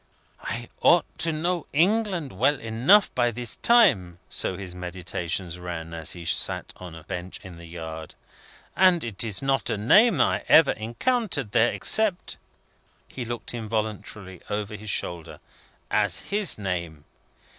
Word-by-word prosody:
"I 120 0 -5
ought 175 -1 +5
to 165 - +2
know 170 +2 -2
England 180 - +1
well 135 +8 +2
enough 120 - +3
by 120 -1 +2
this 120 0 -6
time;" 130 - +4
so 95 - -1
his 95 -3 -7
meditations 90 0 -4
ran, 85 -2 -6
as 80 -1 -1
he 85 -1 -9
sat - - 0
on 90 -3 -9
a 80 - -11
bench 90 +3 -6
in 90 -3 -10
the 85 - -11
yard; 80 -1 -8 0.6
"and 185 -3 +4
it 115 -4 -3
is 110 +1 -2
not 135 0 +1
a - - -1
name 210 - +5
I - - +2
ever 160 -3 +7
encountered 145 - -2
there, 120 +1 +3
except 215 -5 +1 0.4
" - - -38 0.3
he 125 - -6
looked 120 +1 -5
involuntarily 110 -4 -4
over 105 0 -3
his 105 0 -8
shoulder 80 -6 -3 0.5
"as 105 -4 +1
his 205 -2 +2
name. 85 -7 -4
110 Hz, 150 wpm, -25 LUFS, -, 0.6 s, ever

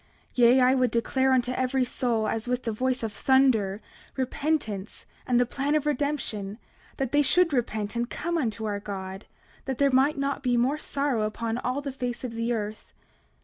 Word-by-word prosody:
29:2 - - -16
Yea, 245 +2 +6
I 255 +1 +5
would 255 -2 +2
declare 260 +4 +1
unto 250 -1 +2
every 255 0 +1
soul, 235 -3 0
as 225 +2 -2
with 250 0 -1
the 225 - -1
voice 255 +3 -1
of 225 - -2
thunder, 230 -8 +3 0.4
repentance 260 -7 -2 0.2
and 245 -1 +3
the 245 - +4
plan 275 +4 -1
of 300 -1 +1
redemption, 270 -8 -2 0.4
that 265 -3 -2
they 290 - +4
should 335 +3 +3
repent 220 -4 -1
and 240 +1 -1
come 340 +1 -3
unto 225 -8 -1
our 205 -1 -2
God, 195 -1 -6 0.4
that 265 -2 -3
there 280 -1 +3
might 270 +4 +3
not 275 +1 -1
be 250 -3 +1
more 265 +5 +1
sorrow 280 -6 0
upon 225 +2 -2
all 255 +3 -2
the 280 -1 -4
face 250 -2 -4
of 245 -2 -4
the 230 +1 -1
earth. 215 -2 -4
250 Hz, 190 wpm, -27 LUFS, 225-270 Hz, 0.4 s, Yea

